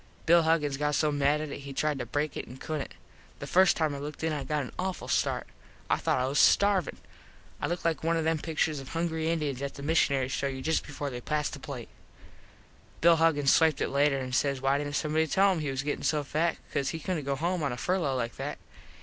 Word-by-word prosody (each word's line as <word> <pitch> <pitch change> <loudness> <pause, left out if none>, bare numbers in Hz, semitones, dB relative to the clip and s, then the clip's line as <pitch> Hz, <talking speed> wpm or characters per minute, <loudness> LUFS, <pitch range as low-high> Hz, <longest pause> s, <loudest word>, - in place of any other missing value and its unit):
Bill 170 +1 +6
Huggins 155 -4 +1
got 150 0 0
so 150 +1 +2
mad 145 +1 +2
at 155 - -4
it - - -6
he 140 0 -8
tried 150 0 0
to 120 - -4
break 145 +3 -2
it - - -5
and 125 +2 -11
couldnt. 155 -1 -4 0.4
The - - -7
first 185 0 +4
time 155 -3 +1
I 140 - -5
looked 150 +2 -7
in 160 -1 0
it 150 - -2
I - - -4
got 150 -2 -1
an 125 - -8
awful 185 0 -3
start. - - 0 0.5
I - - +4
thought - - 0
I 125 - +1
was 135 +2 0
starvin. 200 -6 +4 0.6
I - - 0
looked 175 0 -3
like 165 -1 0
one 165 +1 +2
of 165 - 0
them 160 0 +1
picturs 155 -1 -1
of 135 - -9
hungry 165 -1 -1
Indiens 150 -5 -1
that 140 0 -4
the 140 - -8
mishunaries 140 -4 +2
show 140 - -1
you 130 -1 -5
just 160 0 0
before 145 -1 -4
they 125 -1 -6
pass 150 +2 -1
the 140 - -8
plate. 130 -4 -7 1.1
Bill 170 0 +6
Huggins 150 -4 +4
swiped 160 -3 +4
it - - 0
later 140 0 +2
and 130 -1 -4
says 140 0 +1
why 135 +2 +2
didnt 145 0 -3
somebody 155 +1 +1
tell 195 +5 +4
him 180 - -1
he 150 -2 -2
was 135 0 -2
gettin 145 0 -2
so 150 -2 +1
fat 160 +4 0 0.2
cause 140 - 0
he 160 - -4
couldnt 165 -1 -3
go 140 0 -1
home 175 +4 -1
on 140 -3 0
a 120 - -4
furlo 165 -7 0
like 115 -1 -3
that. - - -4
150 Hz, 250 wpm, -29 LUFS, 140-160 Hz, 1.1 s, Bill